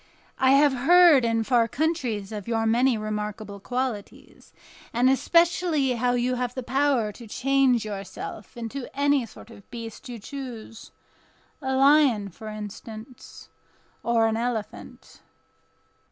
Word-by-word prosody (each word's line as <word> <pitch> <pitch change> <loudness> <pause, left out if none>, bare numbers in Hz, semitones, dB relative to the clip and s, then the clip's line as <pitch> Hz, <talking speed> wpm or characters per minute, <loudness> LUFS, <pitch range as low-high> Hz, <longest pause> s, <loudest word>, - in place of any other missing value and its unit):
I 260 0 +5
have 285 0 +5
heard 310 +1 +6
in 230 -1 +1
far 235 -1 +2
countries 245 -8 -2
of 210 -3 -6
your 225 -1 0
many 240 +2 +3
remarkable 210 -1 -5
qualities, 245 -1 -5 0.4
and 240 +2 +2
especially 335 -1 +2
how 245 0 0
you 245 +1 0
have 250 -1 -3
the 260 - -4
power 265 -4 +1
to 230 +2 -12
change 255 -1 +2
yourself 205 +1 -7
into 240 +3 -6
any 285 -4 +2
sort 225 - -14
of 200 - -16
beast 230 +2 -8
you 240 - -6
choose—a 255 +2 -9
lion, 270 -7 +4
for 220 +5 -11
instance, 215 +3 -9 0.5
or 235 -1 +2
an 225 0 0
elephant." 230 -2 -5
240 Hz, 125 wpm, -25 LUFS, 220-270 Hz, 0.5 s, heard